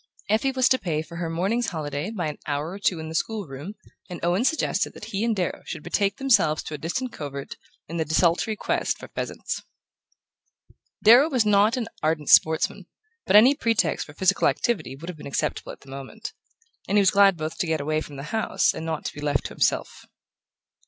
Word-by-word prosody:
Effie 225 +6 +2
was 260 -1 +3
to 260 -1 +3
pay 155 -3 -2
for 170 +2 -10
her 170 -1 -3
morning's 195 +9 0
holiday 150 0 -3
by 200 -7 -3
an 150 - -6
hour 150 +2 -2
or 195 - -7
two 190 -3 +1
in 160 0 -6
the 160 - -7
school 210 +5 -2
room, 145 +8 -8 0.3
and 180 - -6
Owen 180 +6 +2
suggested 315 +4 0
that - - -9
he 200 +2 0
and 230 -1 +1
Darrow 180 -3 -2
should 155 - -6
betake 200 +3 0
themselves 230 - +3
to - - -7
a - - -3
distant 235 - -3
covert 140 -2 -6 0.3
in 170 - -5
the 160 - +1
desultory 170 +7 +2
quest - - -1
for - - -11
pheasants. - - -4 1.4
Darrow 245 +8 +7
was 250 -7 +2
not 210 +4 +4
an 235 -3 -2
ardent 155 -1 0
sportsman, 160 0 +4 0.4
but 195 - +3
any 240 +6 +8
pretext 225 - 0
for 145 - -13
physical 190 +2 +3
activity 195 - -1
would 160 +5 -10
have 175 -4 -7
been - - -8
acceptable 140 - -2
at - - -13
the 135 - -14
moment; 140 - -8 0.5
and 205 - +2
he - - +7
was 190 - +4
glad 200 -2 +5
both 155 0 -5
to 175 - 0
get 160 -1 0
away 155 +2 -1
from 145 - -9
the 140 - -7
house 220 -4 +1
and 160 - -6
not 160 -1 -4
to - - -3
be 145 - -9
left 145 -2 0
to - - -3
himself. - - -1
175 Hz, 215 wpm, -25 LUFS, 155-220 Hz, 1.4 s, any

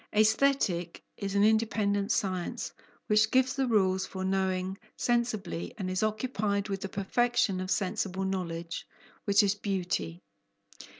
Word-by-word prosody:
Aesthetic 215 -6 +2
is 200 -1 -4
an 200 - +4
independent 210 -2 +2
science, 185 -3 -1 0.3
which 215 +1 +4
gives 260 +2 +3
the 270 -1 +1
rules 190 -4 +2
for 190 -1 -4
knowing 190 0 0 0.2
sensibly, 230 -8 -1
and 185 -3 -3
is 185 - -1
occupied 215 -2 -1
with 195 -1 -3
the 195 - -4
perfection 200 0 +1
of 185 - -4
sensible 195 0 -1
knowledge, 170 -3 -3 0.4
which 200 +1 +5
is 200 -1 +3
beauty. 180 - -2
200 Hz, 130 wpm, -29 LUFS, 185-215 Hz, 0.4 s, which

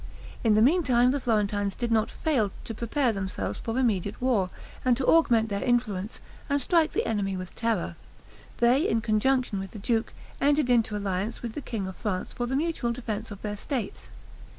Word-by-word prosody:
In 220 -3 +4
the 215 - +5
meantime, 255 -5 +4
the 285 - 0
Florentines 205 -4 0
did 240 -1 -2
not 220 0 +2
fail 260 -11 0
to 225 - -5
prepare 235 +3 0
themselves 195 -1 -3
for 225 +1 -3
immediate 205 -6 0
war; 235 -8 +1 0.3
and 250 -2 +3
to 265 - -1
augment 235 -9 +4
their 200 -1 -2
influence, 225 -5 0 0.3
and 285 0 +2
strike 325 +3 +2
the - - 0
enemy 200 -3 -1
with 185 -1 -7
terror, 225 -7 -1 0.6
they, 250 +7 +3
in 225 - +1
conjunction 235 0 +1
with 195 0 -5
the - - -10
duke, 225 +2 0 0.3
entered 285 -2 +3
into 230 -3 +2
alliance 200 +3 -3
with 235 -2 -4
the 295 - -5
king 220 -7 -4
of 190 0 -6
France 190 -4 -3
for 240 - -2
the 265 - -1
mutual 295 -5 0
defense 230 -3 -4
of 205 -2 -9
their 210 -1 -3
states. 230 -1 -4
230 Hz, 190 wpm, -27 LUFS, 205-255 Hz, 0.6 s, the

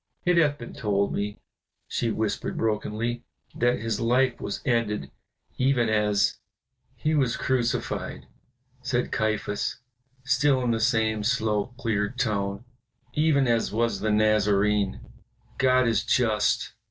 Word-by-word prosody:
"It 180 -1 +3
hath 145 -3 +3
been 120 - -9
told 100 -2 0
me," 105 0 -3 0.5
she 115 - -1
whispered 110 -2 -2
brokenly, 115 +2 -1 0.3
"that 120 +1 +1
his 115 -1 -2
life 125 +2 +2
was - - -3
ended 105 - 0 0.5
even 130 -3 +2
as 105 -2 +2 0.3
" - - -43
"He 155 - -1
was 135 -6 +1
crucified," 125 -2 -1 0.6
said 125 -1 -1
Caiaphas, 110 -2 -1 0.5
still 135 0 +2
in 120 - +1
the 115 - 0
same 110 -2 +1
slow, 110 0 0
clear 105 -5 0
tone, 105 -4 -2 0.5
"even 150 -3 +3
as 115 -1 +1
was 115 +2 0
the 110 - -1
Nazarene. 105 -1 +2 0.6
God 130 -1 +4
is 115 -1 +1
just. 110 -4 +1
115 Hz, 130 wpm, -26 LUFS, 105-125 Hz, 0.6 s, God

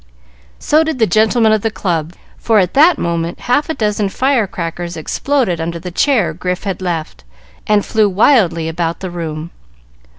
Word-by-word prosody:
So 310 +2 +2
did 320 -3 -3
the 225 - +3
gentlemen 220 +3 +3
of 215 -1 +2
the 225 - 0
club, 170 -6 -3 0.3
for 225 -2 +2
at 185 -3 +2
that 310 +3 +5
moment 170 0 -3
half 290 +6 0
a 320 - -1
dozen 210 -2 -1
fire 255 -1 +1
crackers 170 -1 -5
exploded 190 - -1
under 170 +1 -3
the 180 +2 -7
chair 210 - +1
Grif 180 +2 -4
had 195 -2 -4
left, 160 - -4 0.4
and 210 -1 +2
flew 215 -2 +2
wildly 185 - +3
about 165 0 -3
the 185 -2 -5
room. 165 -1 -5
190 Hz, 170 wpm, -16 LUFS, 170-225 Hz, 0.4 s, that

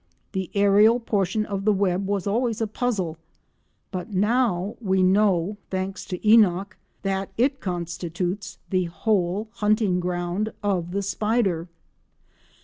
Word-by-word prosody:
The 190 -2 -3
aerial 205 +4 +5
portion 215 -2 0
of 200 -2 -3
the 215 - +4
web 195 -1 +1
was 200 -2 -1
always 230 +2 0
a 225 - +1
puzzle, 205 -7 -2 0.7
but 185 +3 -5
now 205 -1 +1
we 190 -3 +2
know, 195 0 +3
thanks 190 +1 -3
to 180 - -4
Enock, 200 -3 +5 0.3
that 195 0 -1
it 270 +3 +2
constitutes 175 +2 -3
the 185 -1 +2
whole 195 +3 0
hunting 210 -3 +2
ground 180 +4 -2
of 185 -4 0
the 200 +2 -2
spider. 200 -4 0
195 Hz, 130 wpm, -24 LUFS, 180-215 Hz, 0.7 s, aerial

